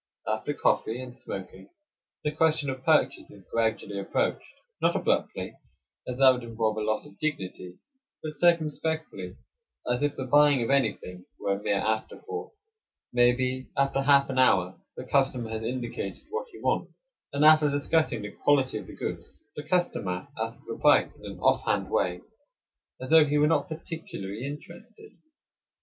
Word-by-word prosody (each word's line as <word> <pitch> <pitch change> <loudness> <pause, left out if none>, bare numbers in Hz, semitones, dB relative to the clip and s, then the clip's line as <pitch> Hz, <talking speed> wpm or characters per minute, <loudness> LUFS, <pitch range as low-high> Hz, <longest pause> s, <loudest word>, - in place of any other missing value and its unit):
After 110 +7 -2
coffee 115 +3 +1
and 125 -1 -8
smoking 95 -6 -8 0.5
the 150 - 0
question 155 -2 +2
of 130 0 -8
purchase 155 0 +2
is 100 -3 -15
gradually 110 -3 0
approached; 100 - -2 0.3
not - - +3
abruptly, - - -1 0.5
as 125 - -4
that 135 -1 +8
would 125 -1 -2
involve 110 -2 -1
a - - -1
loss 110 +4 -1
of 150 - -16
dignity; 95 - -4 0.5
but 155 - -3
circumspectly, 155 - 0 0.5
as 125 +1 0
if 145 -1 0
the 130 - -4
buying 145 -1 +5
of 115 - -1
anything 100 -9 0
were 100 - 0
a 100 - -4
mere 100 -1 +1
afterthought. 110 - -3 0.6
Maybe, 125 +1 +2
after 140 0 +2
half 140 0 +5
an 130 - -1
hour, 95 -8 +3 0.2
the - - -5
customer 130 -5 +1
has 110 0 -3
indicated 120 -4 -4
what 465 +3 -3
he - - -12
wants, - - 0 0.4
and 140 +2 +2
after 155 -1 +7
discussing 145 -4 +1
the 105 - -6
quality 135 -6 +2
of - - -10
the - - -10
goods, - - -6 0.2
the - - -4
customer 145 - -1
asks - - -5
the - - -6
price - - +5
in - - -7
an - - -13
off - - +3
hand - - 0
way, 90 0 0 0.8
as 130 +3 -6
though 160 -1 +8
he 150 0 +1
were 150 - +4
not 160 - +1
particularly 135 -9 -6
interested. 285 - -10
130 Hz, 165 wpm, -27 LUFS, 110-150 Hz, 0.8 s, that